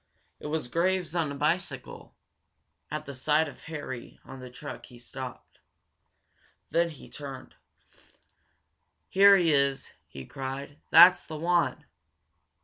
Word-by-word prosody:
It - - -7
was 150 -3 -2
Graves, 180 +3 0
on 165 -4 0
a - - -5
bicycle. 150 -3 -3 0.7
At 155 0 -5
the 140 - -7
sight 150 +4 +1
of - - -11
Harry 145 -7 -7
on 135 0 -10
the 130 0 -9
truck 145 +4 -9
he 125 - -15
stopped. 130 +1 -9 1.1
Then 170 0 +2
he 155 - -12
turned. 135 -3 -9 1.6
"Here 200 +1 +7
he 170 -4 +3
is!" 140 -1 +1 0.2
he 65 -1 -10
cried. 135 +2 -7
"That's 180 +1 +8
the 155 - -7
one!" 175 +2 0
150 Hz, 130 wpm, -28 LUFS, 135-170 Hz, 1.6 s, That's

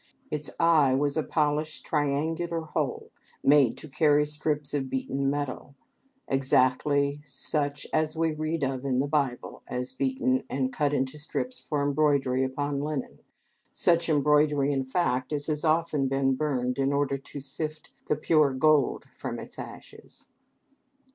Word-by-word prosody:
Its 150 -1 -3
eye 155 -6 +5
was 145 +1 +1
a 160 - +2
polished 150 0 -1
triangular 160 +3 -1
hole 160 - -3 0.3
made 140 -4 +5
to - - -10
carry 150 0 +3
strips 150 -1 -2
of 135 -2 -1
beaten 135 +1 -1
metal, 140 -1 -4 0.5
exactly 140 +2 +2
such 145 +1 -2
as 155 0 +1
we 165 0 +2
read 155 0 -2
of 135 -1 -1
in 135 -2 0
the 135 - +2
Bible 140 -4 -1
as 125 +1 -4
beaten 130 -1 0
and 130 -1 -1
cut 145 -2 +1
into 135 +1 -1
strips 250 - -4
for 145 -2 -2
embroidery 140 -3 +2
upon 140 +2 -2
linen, 145 -3 -4 0.6
such 170 -1 +2
embroidery, 150 -1 +3
in 135 -2 -1
fact, 130 -3 0
as 145 -1 -1
has 150 -1 -2
often 155 -3 +2
been 135 0 +1
burned 130 -3 -1
in 135 0 +2
order 140 -1 0
to 140 - -9
sift 155 +3 -5 0.2
the - - +2
pure 150 -2 +3
gold 155 +2 +3
from - - -5
its - - -9
ashes. - - -11
145 Hz, 150 wpm, -27 LUFS, 135-155 Hz, 0.6 s, eye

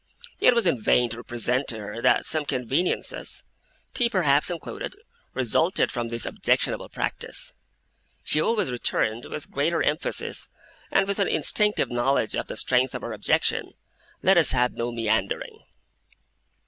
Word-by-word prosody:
It 250 - +5
was 235 -3 +2
in 135 -10 +1
vain 120 +2 +3
to 115 - -5
represent 120 +3 -1
to 115 - 0
her 110 +2 -6
that - - +3
some 155 -1 0
conveniences, 135 +6 -2 0.5
tea 245 -3 +2
perhaps 150 -9 +2
included, 175 - -6 0.4
resulted 145 - +1
from 120 -2 -3
this 115 0 -2
objectionable - - 0
practice. - - -3 0.7
She 155 - +2
always 210 - +1
returned, 120 -1 0
with 150 - -7
greater 160 +4 +1
emphasis 150 +3 -1 0.4
and 195 0 +2
with 200 +1 -1
an 200 - +3
instinctive 210 - +2
knowledge 120 -2 +1
of - - -3
the - - -6
strength 125 +1 +1
of - - -5
her - - -4
objection, - - 0 0.5
'Let 190 -1 +6
us 165 - +3
have 125 -1 +2
no 120 +1 -3
meandering. 110 -3 -2
135 Hz, 150 wpm, -25 LUFS, 120-175 Hz, 0.7 s, Let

